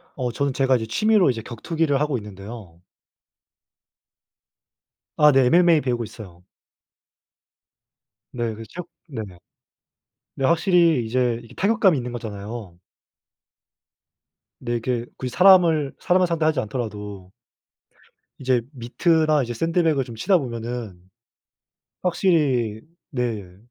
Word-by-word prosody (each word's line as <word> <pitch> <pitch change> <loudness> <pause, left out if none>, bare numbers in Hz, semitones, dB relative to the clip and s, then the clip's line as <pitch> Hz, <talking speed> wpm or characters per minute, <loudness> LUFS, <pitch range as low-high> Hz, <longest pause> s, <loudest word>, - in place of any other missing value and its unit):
어 125 -4 -2
저는 140 +3 -1
제가 135 -1 +2
이제 110 -2 -1
취미로 210 - +3
이제 115 -3 -1
격투기를 145 +5 -1
하고 150 -3 0
있는데요. 100 -4 -10 2.4
아 150 -1 +6
네. 135 -1 +4
MMA 170 0 +5
배우고 120 -2 -1
있어요. 90 -5 -11 1.9
네. 120 -2 -2
그 115 - -9
체육 180 0 -8 0.2
네네. 110 - -7 1.0
근데 135 - 0
확실히 170 - +3
이제 120 0 0
이게 115 +2 -15
타격감이 195 - +3
있는 125 -2 -4
거잖아요. 105 -4 -7 1.8
근데 120 - -4
이렇게 120 0 -2
굳이 130 - -4
사람을 170 -6 +5
사람을 180 0 +2
상대하지 160 -2 +1
않더라도 105 -4 -6 1.1
이제 130 -2 +1
미트나 155 +4 +1
이제 120 0 -4
샌드백을 165 +1 +1
좀 120 -2 -10
치다 185 - +2
보면은 120 - -5 1.0
확실히 145 - +1 0.3
네 110 - -4
125 Hz, 255 characters per minute, -23 LUFS, 115-160 Hz, 2.4 s, 아